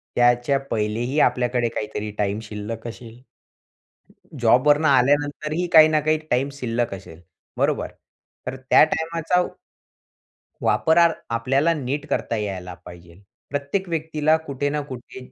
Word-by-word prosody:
त्याच्या 120 +3 +3
पहिलेही 115 +6 -1
आपल्याकडे 125 -3 +2
काहीतरी 105 -1 -5
टाईम 100 0 -1
शिल्लक 110 +2 -6
असेल. 115 0 -10 1.2
जॉबवरनं 145 +6 +4
आल्यानंतरही 145 +5 +1
काही 155 -1 +9
ना 155 -1 +2
काही 155 +1 +2
टाईम 130 +3 +1
शिल्लक 120 -5 -2
असेल, 90 -3 -11 0.4
बरोबर? - - 0 0.6
तर 130 - -3
त्या - - +7
टाईमाचा 165 +2 0 1.2
...वापर 170 +1 +4 0.2
आपल्याला 135 +7 +1
नीट 145 0 -4
करता 115 - -1
यायला 95 -4 -5
पाहिजे. 85 -1 -13 0.4
प्रत्येक 145 +7 -2
व्यक्तीला 155 -1 +1
कुठे 140 +1 -2
ना 150 +1 -1
कुठे 125 0 -9
130 Hz, 120 wpm, -22 LUFS, 115-150 Hz, 1.2 s, काही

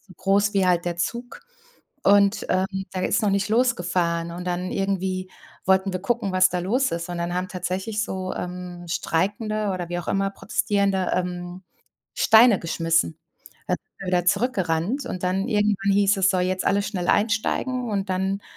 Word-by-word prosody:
so 190 - -18
groß 200 +3 +2
wie 195 -1 +3
halt 175 -1 +2
der 175 -1 -2
Zug. 235 +8 -4 0.6
Und, 200 +1 +4
ähm, 185 +1 +2 0.3
der 185 -1 -1
ist - - +1
noch 210 - +2
nicht 200 +1 0
losgefahren. 175 -8 +1
Und 175 +1 -6
dann 180 +1 -2
irgendwie 190 -1 -2 0.4
wollten 190 +1 +3
wir 185 - -3
gucken, 225 -3 -1
was 185 0 +5
da 180 - -1
los 245 +10 +1
ist. 170 +1 -3
Und 175 - -4
dann 170 +1 -2
haben 185 +1 -2
tatsächlich 190 +3 -3
so, 185 -3 -4
ähm, 180 -1 -6
streikende 205 +6 -1
oder 175 -2 -4
wie 175 - -2
auch 175 - -7
immer 195 0 +1
Protestierende, 200 -3 0
ähm, 180 0 -4 0.5
Steine 235 - +6
geschmissen. 165 - 0 0.5
Da - - +2
sind - - -14
wir 195 - -6
wieder 180 -1 +1
zurück 230 +7 +2
gerannt. 185 - -1
Und 185 - -5
dann 190 +2 0
irgendwann 205 -2 +1
hieß 200 +1 +3
es: 190 0 +4
„so 185 - +1
jetzt 185 +1 -1
alles 200 +1 +2
schnell 180 -4 -3
einsteigen." 230 +3 0
Und 200 -1 -2
dann, 190 +2 -1
190 Hz, 180 wpm, -24 LUFS, 180-205 Hz, 0.6 s, Steine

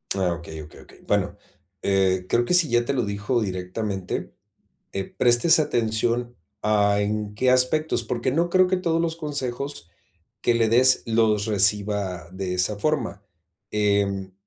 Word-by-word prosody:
Ah 95 -3 0
okey, 80 -2 -8
okey, 75 - -15
okey, - - -18
bueno, - - 0 0.5
eh, 95 -2 +1
creo 120 +4 +2
que 180 - +1
si 175 -3 +5
ya 120 -2 +2
te 140 - -2
lo 125 -4 0
dijo 100 +4 -2
directamente, 95 0 -4 0.6
eh, 95 - -3
prestes 120 - +3
atención, 120 -2 -1 0.3
ah, 105 -1 +2
en 105 0 -2
qué 125 +4 +2
aspectos, 130 +2 +2
porque 120 +2 -2
no 170 +5 0
creo 185 +1 +4
que 185 - +1
todos 165 -2 -1
los 165 -1 -1
consejos 140 - -4 0.5
que 120 - +2
le 115 -1 +2
des 125 +3 +4
los 110 -2 +1
reciba 100 -3 +1
de 95 -1 -4
esa 95 +3 0
forma, 115 -7 -2 0.5
em, 100 -2 0
110 Hz, 155 wpm, -23 LUFS, 100-125 Hz, 0.6 s, si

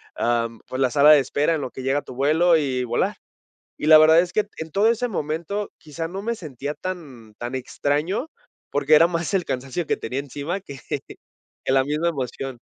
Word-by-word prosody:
am, 115 -1 0
pues 130 - -5
la 130 -2 +3
sala 145 +1 +6
de 150 - +8
espera 145 +4 +1
en 150 - -3
lo 130 - -5
que 130 - -8
llega 135 +2 +1
tu - - -10
vuelo, 160 +5 +4
y 130 -4 -1
volar. - - -1 0.6
Y - - -4
la 155 - +10
verdad 160 +1 +7
es 175 +1 +1
que 215 - +2
en 160 -1 -6
todo 205 +5 +3
ese 235 +2 +1
momento 170 +3 -3
quizá 165 +1 -5
no 195 +2 -5
me 235 +2 -2
sentía 145 - -6
tan 140 -14 -8
tan 120 +2 -5
extraño, 150 - -1 0.4
porque 145 +2 +3
era 165 +2 +7
más 170 -1 -3
el 185 -3 +1
cansancio 130 +6 -3
que - - +1
tenía 130 - -4
encima 145 +6 -4
que 140 -8 -10 0.8
que - - -1
la 135 0 +4
misma 150 +5 0
emoción. 135 -3 -4
150 Hz, 205 wpm, -23 LUFS, 135-170 Hz, 0.8 s, la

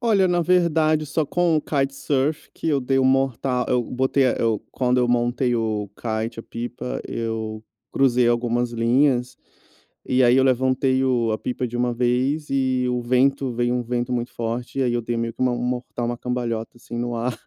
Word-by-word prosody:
Olha, 210 -6 +3
na 175 0 +2
verdade 160 -3 +2
só 150 +1 -1
com 175 +1 +2
o - - +2
kitesurf 140 +1 -1
que - - -3
eu 145 -3 +2
dei 135 +1 +1
o 130 - +3
morta 130 -1 +1
eu 125 -1 +2
botei 130 +3 +1
a 125 - +3
eu 115 -2 0
quando 125 -1 +1
eu 125 -1 +2
montei 120 +1 +1
o 110 -2 -2
kite, 110 0 -3
a - - -12
pipa, 120 +2 -5
eu 110 -1 -4 0.3
cruzei 125 -3 +3
algumas 120 0 0
linhas 125 +2 +1 0.7
e 130 0 +2
aí 120 +1 +5
eu 130 - +4
levantei 130 0 +2
o 120 -4 +1
a 110 - -1
pipa 125 0 -3
de 120 0 -5
uma 120 0 0
vez 125 +5 0
e 130 -2 +1
o 125 0 -1
vento 130 +2 +2
veio 120 +1 0
um 125 - 0
vento 120 +1 -2
muito 120 -1 -2
forte 120 +3 -3
e - - +3
aí 125 -2 +1
eu 120 - 0
dei 120 +1 -3
meio 115 0 -2
que 115 - -17
uma 125 -1 +2
um 120 0 -3
mortal, 125 -1 -3
uma 120 0 -3
cambalhota, 120 -2 -3
assim, 120 0 -8
no 120 0 -2
ar. 120 +2 -1
125 Hz, 205 wpm, -23 LUFS, 120-135 Hz, 0.7 s, aí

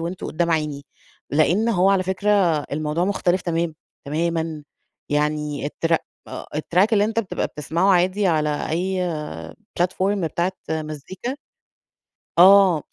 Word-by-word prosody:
وأنتم 170 +3 -4
قدّام 170 +2 -1
عيني، 150 -3 -1 0.5
لأن 170 +10 +2
هو 195 -3 +3
على 195 -1 +3
فكرة 190 +3 -1 0.4
الموضوع 155 +3 -1
مختلف 185 -2 +1
تمام، 165 -1 -1 0.3
تمامًا 160 +1 -2 0.5
يعني 150 -1 -1
التر 165 +2 0 0.6
الtrack 175 +5 +2
اللي 205 -1 +4
أنت 220 +1 -2
بتبقى 200 - -3
بتسمعه 165 +6 0
عادي 185 +3 +2
على 150 -3 0
أي 185 +3 -1 0.8
platform 185 +2 +1 0.2
بتاعة 170 +3 -1 0.2
مزيكا 160 - -5 1.0
آه 185 -3 +7
170 Hz, 115 wpm, -22 LUFS, 155-190 Hz, 1.0 s, آه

